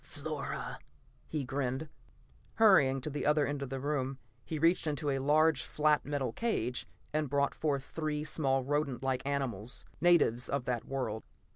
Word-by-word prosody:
"Flora," -, -, -5 dB, 0.5 s
he 150 Hz, -4 st, -2 dB
grinned. 135 Hz, +2 st, -2 dB, 0.7 s
Hurrying 150 Hz, -12 st, +5 dB
to 140 Hz, -, -3 dB
the 145 Hz, -, -3 dB
other 150 Hz, 0 st, +3 dB
end 145 Hz, 0 st, -3 dB
of 140 Hz, -, -4 dB
the 135 Hz, 0 st, -3 dB
room, 135 Hz, -1 st, -1 dB, 0.3 s
he 160 Hz, -, -4 dB
reached 165 Hz, +2 st, +3 dB
into 145 Hz, -1 st, 0 dB
a 135 Hz, -, 0 dB
large 150 Hz, +1 st, +4 dB
flat 150 Hz, +2 st, +2 dB
metal 140 Hz, -5 st, -1 dB
cage 125 Hz, -, -1 dB, 0.3 s
and 155 Hz, -2 st, 0 dB
brought 140 Hz, 0 st, +1 dB
forth 140 Hz, -3 st, -1 dB
three 150 Hz, 0 st, -3 dB
small 135 Hz, -4 st, +1 dB
rodent 140 Hz, -2 st, -1 dB
like 130 Hz, -1 st, 0 dB
animals, 125 Hz, -5 st, -2 dB, 0.2 s
natives 155 Hz, -9 st, +4 dB
of 140 Hz, -3 st, -1 dB
that 120 Hz, -2 st, -2 dB
world. 120 Hz, -5 st, -3 dB
140 Hz, 160 wpm, -32 LUFS, 130-150 Hz, 0.7 s, Hurrying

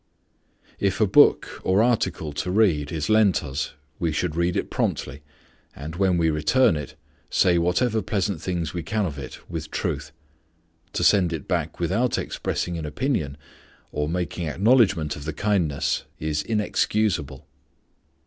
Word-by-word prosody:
If 100 Hz, 0 st, 0 dB
a 110 Hz, -, +5 dB
book 95 Hz, -, +4 dB
or 95 Hz, +4 st, +3 dB
article 110 Hz, -10 st, 0 dB
to 80 Hz, +5 st, -3 dB
read 90 Hz, -8 st, +2 dB
is 80 Hz, -2 st, -2 dB
lent 110 Hz, -5 st, +4 dB
us, 70 Hz, 0 st, -4 dB, 0.3 s
we 85 Hz, -2 st, 0 dB
should 80 Hz, +1 st, -1 dB
read 85 Hz, +1 st, +1 dB
it -, -, -3 dB
promptly, 70 Hz, +1 st, -2 dB, 0.5 s
and 75 Hz, +3 st, -7 dB
when 95 Hz, -1 st, +2 dB
we 80 Hz, -1 st, +2 dB
return 80 Hz, +8 st, +3 dB
it 75 Hz, -1 st, -6 dB, 0.3 s
say 90 Hz, -3 st, +3 dB
whatever 110 Hz, +7 st, +1 dB
pleasant 95 Hz, -3 st, -1 dB
things 85 Hz, -4 st, -2 dB
we 90 Hz, -, -3 dB
can 105 Hz, +5 st, -1 dB
of 75 Hz, -5 st, -5 dB
it 65 Hz, -, -9 dB
with 80 Hz, -3 st, -5 dB
truth. 75 Hz, 0 st, -3 dB, 0.8 s
To -, -, -1 dB
send 90 Hz, -3 st, +4 dB
it 80 Hz, -4 st, -5 dB
back -, -, -2 dB
without 95 Hz, +9 st, +1 dB
expressing 85 Hz, -1 st, -3 dB
an 80 Hz, -, -5 dB
opinion, 75 Hz, -, -2 dB, 0.5 s
or 75 Hz, 0 st, -2 dB
making 85 Hz, -1 st, -2 dB
acknowledgment 95 Hz, -, +3 dB
of 70 Hz, -, -8 dB
the 80 Hz, -, -3 dB
kindness, 90 Hz, -6 st, 0 dB
is 75 Hz, -1 st, -1 dB
inexcusable. 105 Hz, -, 0 dB
85 Hz, 150 wpm, -24 LUFS, 75-100 Hz, 0.8 s, a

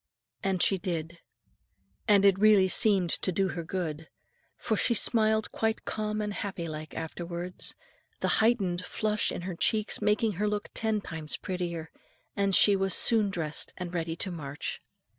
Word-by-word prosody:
And 190 Hz, -2 st, 0 dB
she 195 Hz, -, +2 dB
did. 170 Hz, -1 st, -4 dB, 0.9 s
And 200 Hz, -1 st, +5 dB
it 195 Hz, -1 st, +5 dB
really 210 Hz, -3 st, +6 dB
seemed 185 Hz, -2 st, +4 dB
to 185 Hz, -, 0 dB
do 190 Hz, +2 st, 0 dB
her 170 Hz, -1 st, -4 dB
good; 160 Hz, -3 st, -4 dB, 0.5 s
for 220 Hz, -, -1 dB
she 235 Hz, +3 st, +2 dB
smiled 220 Hz, -1 st, +2 dB
quite 220 Hz, 0 st, -1 dB
calm 215 Hz, 0 st, -2 dB
and 210 Hz, -1 st, -3 dB
happy 190 Hz, -4 st, -4 dB
like 155 Hz, 0 st, -7 dB
afterwards 175 Hz, +2 st, -5 dB, 0.4 s
the -, -, 0 dB
heightened 195 Hz, -6 st, +1 dB
flush 210 Hz, +3 st, 0 dB
in -, -, -5 dB
her 180 Hz, +1 st, -5 dB
cheeks 215 Hz, +4 st, 0 dB
making 215 Hz, +1 st, +2 dB
her 210 Hz, -, +2 dB
look 210 Hz, 0 st, -2 dB
ten 220 Hz, -2 st, 0 dB
times 160 Hz, -5 st, -4 dB
prettier; 170 Hz, -3 st, -4 dB, 0.4 s
and 200 Hz, -2 st, +2 dB
she 205 Hz, -, +6 dB
was 195 Hz, 0 st, +1 dB
soon 220 Hz, -4 st, +4 dB
dressed 160 Hz, -5 st, -3 dB
and 180 Hz, -1 st, -6 dB
ready 165 Hz, -1 st, -2 dB
to 185 Hz, +2 st, -2 dB
march. 150 Hz, -4 st, -5 dB
190 Hz, 160 wpm, -28 LUFS, 170-210 Hz, 0.9 s, really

